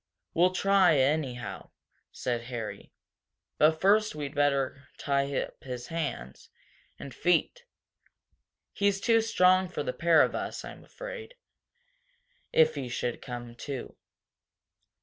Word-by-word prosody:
"We'll 175 Hz, +2 st, +4 dB
try 195 Hz, -1 st, +4 dB
it, 135 Hz, -3 st, +4 dB
anyhow," 135 Hz, -4 st, -2 dB, 0.4 s
said 120 Hz, -1 st, -3 dB
Harry. 120 Hz, -3 st, -6 dB, 0.7 s
"But 160 Hz, +1 st, +4 dB
first 210 Hz, +1 st, +3 dB
we'd 145 Hz, -2 st, -5 dB
better 140 Hz, -2 st, 0 dB
tie 140 Hz, 0 st, 0 dB
up -, -, -7 dB
his 125 Hz, -2 st, -6 dB
hands 145 Hz, -, -5 dB, 0.5 s
and 140 Hz, -, -9 dB
feet. 180 Hz, -, +1 dB, 1.1 s
He's 200 Hz, -1 st, +1 dB
too 225 Hz, +2 st, +3 dB
strong 185 Hz, -4 st, +3 dB
for 175 Hz, -, -4 dB
the 125 Hz, -, -3 dB
pair 165 Hz, +3 st, +5 dB
of -, -, -1 dB
us, -, -, -4 dB
I'm -, -, -10 dB
afraid, -, -, -9 dB, 1.2 s
if 155 Hz, 0 st, +4 dB
he 135 Hz, -4 st, -5 dB
should 120 Hz, 0 st, -3 dB
come 120 Hz, -2 st, -7 dB
to." 135 Hz, -1 st, -6 dB
150 Hz, 125 wpm, -29 LUFS, 130-185 Hz, 1.2 s, pair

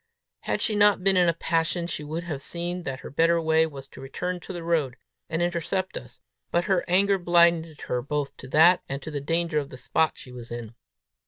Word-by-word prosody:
Had -, -, -2 dB
she 215 Hz, -, 0 dB
not 205 Hz, -2 st, +4 dB
been 195 Hz, 0 st, +4 dB
in 180 Hz, -2 st, +4 dB
a -, -, +2 dB
passion, 165 Hz, +1 st, 0 dB
she 160 Hz, -3 st, -4 dB
would 160 Hz, +3 st, -4 dB
have 155 Hz, -5 st, -5 dB
seen 175 Hz, +4 st, -3 dB
that 130 Hz, -1 st, -4 dB
her -, -, -9 dB
better 165 Hz, +4 st, +3 dB
way 160 Hz, 0 st, +3 dB
was 135 Hz, -3 st, -10 dB
to -, -, -12 dB
return 180 Hz, +7 st, -4 dB
to 175 Hz, -, -9 dB
the 175 Hz, -2 st, -6 dB
road, 155 Hz, -7 st, 0 dB, 0.3 s
and 165 Hz, +1 st, 0 dB
intercept 175 Hz, +2 st, -2 dB
us; -, -, -8 dB, 0.3 s
but 175 Hz, -, +1 dB
her 190 Hz, -2 st, +1 dB
anger 195 Hz, +2 st, +3 dB
blinded 170 Hz, -3 st, +3 dB
her 125 Hz, -, -2 dB
both 140 Hz, +1 st, -3 dB
to 130 Hz, -, -10 dB
that 165 Hz, +6 st, +5 dB
and 135 Hz, -, -3 dB
to 155 Hz, -, -6 dB
the 145 Hz, -2 st, -3 dB
danger 165 Hz, +1 st, 0 dB
of 140 Hz, -1 st, -5 dB
the 130 Hz, -, -10 dB
spot 160 Hz, +5 st, +1 dB
she 125 Hz, -, -12 dB
was 120 Hz, -1 st, -9 dB
in. 120 Hz, -1 st, -7 dB
165 Hz, 225 wpm, -26 LUFS, 145-175 Hz, 0.3 s, that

